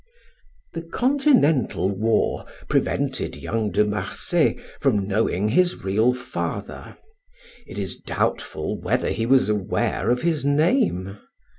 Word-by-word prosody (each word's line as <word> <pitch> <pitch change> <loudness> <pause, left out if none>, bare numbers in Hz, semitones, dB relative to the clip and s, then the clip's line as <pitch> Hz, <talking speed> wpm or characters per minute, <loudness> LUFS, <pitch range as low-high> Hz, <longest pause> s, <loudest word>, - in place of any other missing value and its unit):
The 165 - -4
continental 165 - +2
war 110 +3 0 0.2
prevented - - -1
young 110 -2 -2
De 105 +3 +2
Marsay 105 0 0 0.2
from 100 -2 +1
knowing 105 -1 0
his 175 +9 +1
real 110 +6 +2
father. 125 - -6 0.7
It - - -9
is - - -4
doubtful - - -2
whether - - 0
he 115 0 -2
was 135 +1 +4
aware 105 -1 -1
of 125 +1 +1
his 160 -5 +1
name. 145 - +1
115 Hz, 115 wpm, -23 LUFS, 105-160 Hz, 0.7 s, was